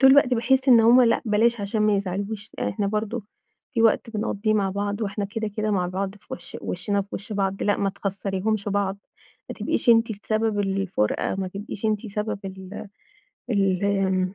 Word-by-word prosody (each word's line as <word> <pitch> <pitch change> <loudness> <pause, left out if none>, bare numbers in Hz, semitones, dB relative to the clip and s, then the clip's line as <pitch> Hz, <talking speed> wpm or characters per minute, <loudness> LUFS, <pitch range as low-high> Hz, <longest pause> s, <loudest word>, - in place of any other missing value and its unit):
طول 265 0 +8
الوقت 265 -2 +6
باحس 260 +3 +2
إن 235 -3 +8
همّ 235 +3 +7
لأ 230 - +3
بلاش 225 +1 +2
عشان 205 +2 -1
ما 210 -1 +3
يزعلوش، 200 +2 -4
يعني 100 - 0
إحنا 200 - -1
برضو 215 +1 -2 0.5
في 230 - +2
وقت 230 0 +3
بنقضيه 215 0 -1
مع 195 -2 +1
بعض، 205 +2 -2
وإحنا 200 0 -2
كده 220 +1 -3
كده 215 0 0
مع 180 -3 +1
بعض 190 +2 -3
في 205 - -21
وش 175 - -7
وشنا 200 +2 -1
في 200 - -18
وش 200 +3 -6
بعض، 195 -1 -1
لأ 205 - +2
ما 195 -1 0
تخسّريهمش 200 +1 -2
بعض، 200 -1 0 0.5
ما - - -5
تبقيش - - -2
أنتِ 230 0 +5
السبب 215 +1 -1
الفُرقة، 195 - 0
ما 190 -1 -3
تبقيش 200 +2 -7
أنتِ 215 +1 -1
سبب 210 +1 -3
ال 190 +2 -8 0.6
ال 195 -3 +2
آمم... 190 -1 +1
205 Hz, 190 wpm, -24 LUFS, 195-220 Hz, 0.6 s, طول